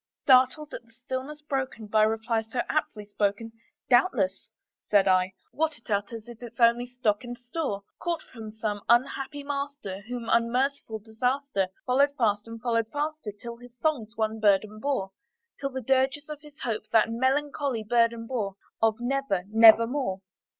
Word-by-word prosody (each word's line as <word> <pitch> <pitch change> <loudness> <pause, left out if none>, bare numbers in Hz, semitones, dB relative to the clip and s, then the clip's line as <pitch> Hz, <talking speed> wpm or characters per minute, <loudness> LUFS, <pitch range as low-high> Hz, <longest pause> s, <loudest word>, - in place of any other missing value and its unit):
Startled 260 +3 +4
at - - -5
the 230 - -26
stillness 260 +5 -6
broken 265 -6 -3
by 215 +1 +2
reply 225 +1 +1
so 225 +3 -3
aptly 215 -9 -2
spoken, 205 +2 -1 0.4
"Doubtless," 245 - +2 0.4
said 200 -2 +4
I, 185 0 +3 0.2
"what 315 0 -1
it 230 - -12
utters 210 +3 -2
is 240 -1 -11
its 235 0 -10
only 235 +1 +4
stock 245 -3 0
and 245 0 -7
store, 245 -4 -4 0.2
Caught 340 -2 -2
from 220 -3 -10
some 210 -1 -3
unhappy 270 +4 +2
master 280 -8 -4
whom 245 -1 -5
unmerciful 235 0 +1
Disaster 230 0 -1 0.2
Followed 280 +3 +3
fast 210 -3 +1
and 230 0 -8
followed 230 -2 0
faster 300 -5 -3
till 235 +3 -9
his 245 0 -15
songs 250 -9 -1
one 220 0 -1
burden 210 0 +2
bore, 215 -8 -1 0.5
Till 275 - -2
the 260 -1 -5
dirges 270 +4 +1
of 300 -1 -7
his 300 0 -16
Hope 215 -2 -3
that 225 0 +4
melancholy 265 0 0
burden 230 +1 +2
bore 215 -6 -3 0.3
Of 225 0 +3
'Never 245 -6 -1
nevermore.'" 225 -1 +5
235 Hz, 155 wpm, -27 LUFS, 215-270 Hz, 0.5 s, nevermore